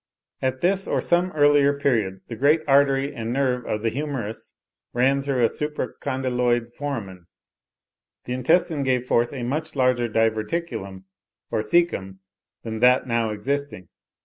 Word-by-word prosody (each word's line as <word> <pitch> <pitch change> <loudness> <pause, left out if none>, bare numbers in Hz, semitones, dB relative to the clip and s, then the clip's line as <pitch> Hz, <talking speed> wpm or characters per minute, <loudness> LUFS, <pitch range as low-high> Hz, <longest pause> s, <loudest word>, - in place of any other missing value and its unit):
At 130 0 -1
this 190 +2 +1
or - - 0
some 175 +1 +1
earlier 145 -1 +4
period, 110 -9 0
the 115 - -6
great 145 +6 +3
artery 140 0 +3
and 115 -3 -4
nerve 125 -2 0
of 105 0 -2
the 115 - +2
humerus 130 -5 -5 0.4
ran 135 +3 +2
through 135 -3 0
a - - +6
supra 150 0 -4
condyloid 125 -3 -1
foramen. 105 -12 -6 1.0
The 125 - -4
intestine 155 +4 +2
gave 130 -2 0
forth 120 -1 +1
a 130 -3 -5
much 150 +6 -3
larger 125 -3 +2
diverticulum 110 - -2 0.5
or - - 0
caecum 105 - 0 0.5
than 110 -1 -5
that 125 +2 +4
now 115 -2 0
existing. 110 -3 -3
130 Hz, 145 wpm, -23 LUFS, 115-145 Hz, 1.0 s, a